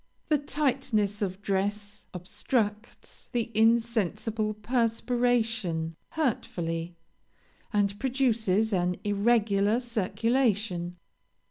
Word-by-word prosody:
The 300 -2 +3
tightness 260 -8 0
of 195 0 -3
dress 205 +1 -2
obstructs 205 +4 -3
the 235 -1 -1
insensible 220 -1 +1
perspiration 225 -6 0 0.2
hurtfully, 175 - -2 0.8
and 205 -1 +1
produces 230 -6 +1
an 180 -1 +1
irregular 205 0 +2
circulation. 215 -5 0
215 Hz, 75 wpm, -28 LUFS, 200-235 Hz, 0.8 s, The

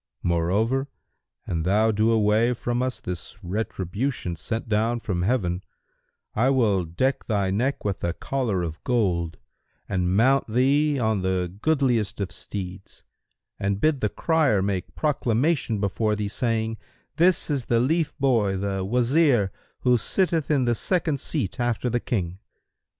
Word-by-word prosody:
Moreover, 100 +11 +1 0.6
an 85 -2 -2
thou 105 +6 +3
do 110 +2 +2
away 110 +2 +3
from 120 +1 -2
us 130 0 -2
this 90 +1 -6
retribution 100 +2 -3
sent 110 +9 -4
down 110 +2 +1
from 95 -6 -2
Heaven, 95 -4 0 0.7
I 120 +5 +2
will 110 -9 +2
deck 130 +12 -1
thy 100 -4 +1
neck 125 +7 -1
with 100 -2 -2
a 85 - 0
collar 115 -6 -1
of 80 -1 -6
gold 90 -9 0 0.5
and 90 -1 0
mount 135 +4 +4
thee 140 +6 +2
on 110 -5 +1
the 90 -1 -1
goodliest 130 -11 +1
of 95 -3 -2
steeds 95 +1 -7 0.6
and 100 0 -1
bid 155 0 +2
the 105 - +1
crier 150 - +2
make 95 -2 -3
proclamation 140 -4 +1
before 105 +2 0
thee, 105 -1 -2
saying, 115 0 -1 0.4
'This 175 -1 +3
is 135 -4 -1
the 115 - +2
lief[FN#173] 155 +5 0
boy, 115 -8 +2
the 95 0 -2
Wazir 120 - +3 0.3
who 125 -2 +3
sitteth 170 - 0
in 140 -4 +2
the 120 - +2
second 160 - 0
seat 105 - -3
after 120 0 0
the 120 - +1
King!' 95 -7 -3
110 Hz, 145 wpm, -25 LUFS, 95-130 Hz, 0.7 s, mount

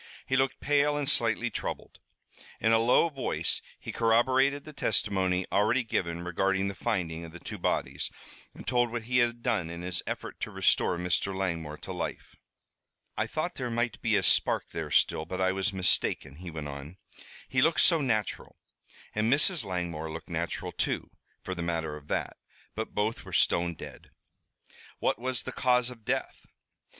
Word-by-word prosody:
He 130 - 0
looked 135 0 +1
pale 145 0 +2
and 145 -2 -2
slightly 115 0 +2
troubled. - - -5 0.6
In 110 - +3
a 115 - +5
low 120 +8 +5
voice 135 -4 0 0.2
he - - -6
corroborated 130 +5 +3
the 155 - -10
testimony 95 -6 +1
already 110 +6 +3
given 85 -6 -2
regarding 95 +2 +1
the - - -4
finding 85 -7 -2
of 85 -1 -9
the 85 - -9
two - - -7
bodies, - - -1 0.5
and - - -10
told 120 -1 +2
what 120 -1 -3
he 125 +2 +2
had 120 0 +1
done 90 -7 0
in 85 +1 -6
his 90 0 0
effort - - -5
to - - -3
restore 90 - +2
Mr. 90 +2 0
Langmore 85 -5 -2
to - - -7
life. - - -5 0.8
"I 110 - 0
thought 155 +8 -2
there 125 -2 -4
might 115 -1 -1
be - - +2
a - - +2
spark - - +2
there - - -4
still, 80 - +3
but 90 +3 -5
I 95 0 +3
was 95 +1 0
mistaken," 90 -6 +1
he 90 +1 -7
went 80 -2 -5
on. 70 +5 -8 0.5
"He 130 0 +2
looked 160 +3 +4
so 165 -3 +5
natural 110 -6 -1 0.6
and 110 +2 +1
Mrs. 150 +2 +5
Langmore 85 -5 -3
looked 80 0 -8
natural, 85 +1 -2
too, - - -2 0.3
for 95 - -3
the 90 - -5
matter 80 -3 -2
of 75 -1 -12
that. - - -2 0.4
But 110 0 -5
both 110 +2 0
were - - -10
stone 85 0 +3
dead." - - -10 0.9
"What - - 0
was 130 0 -2
the - - -5
cause 125 -1 +2
of 115 -3 -13
death?" 135 +2 -2
105 Hz, 180 wpm, -29 LUFS, 85-125 Hz, 0.9 s, a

